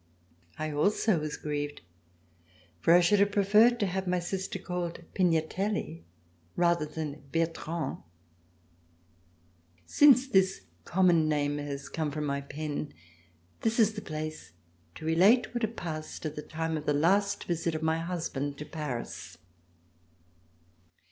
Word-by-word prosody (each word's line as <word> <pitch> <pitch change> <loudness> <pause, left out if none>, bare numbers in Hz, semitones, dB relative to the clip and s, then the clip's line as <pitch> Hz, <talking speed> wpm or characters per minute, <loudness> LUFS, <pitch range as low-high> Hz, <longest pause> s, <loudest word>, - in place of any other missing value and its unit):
I 155 0 -3
also 195 +5 +2
was 150 0 -4
grieved, 145 -1 -4 1.0
for 125 - +3
I 175 - +7
should 195 +4 +4
have 200 0 +3
preferred 215 +4 +5
to 205 - +2
have 190 0 -2
my 180 0 +1
sister 190 +2 -3
called 180 -2 -4
Pignatelli 180 - 0 0.5
rather 170 -3 +2
than 155 -1 -5
Bertrand. 165 -2 -2 1.9
Since 270 - +6
this 190 -6 +2 0.2
common 175 -4 +3
name 145 -1 0
has 140 -1 -5
come 155 -2 -2
from 150 +1 -3
my 140 -1 -1
pen, 145 +1 -5 0.7
this 225 +1 0
is 220 -1 +4
the 210 - -6
place 155 - -6 0.4
to - - -9
relate 195 +12 +4
what 240 - -2
had 220 0 -2
passed 155 -2 -6
at 155 -1 -3
the 150 - -4
time 160 +1 -3
of 150 - -7
the 150 - +3
last 195 +7 +2
trip 170 -1 -1
of 155 - -3
my 160 0 +1
husband 160 -5 -3
to 150 - -6
Paris. 145 -6 -6
165 Hz, 135 wpm, -29 LUFS, 150-190 Hz, 1.9 s, I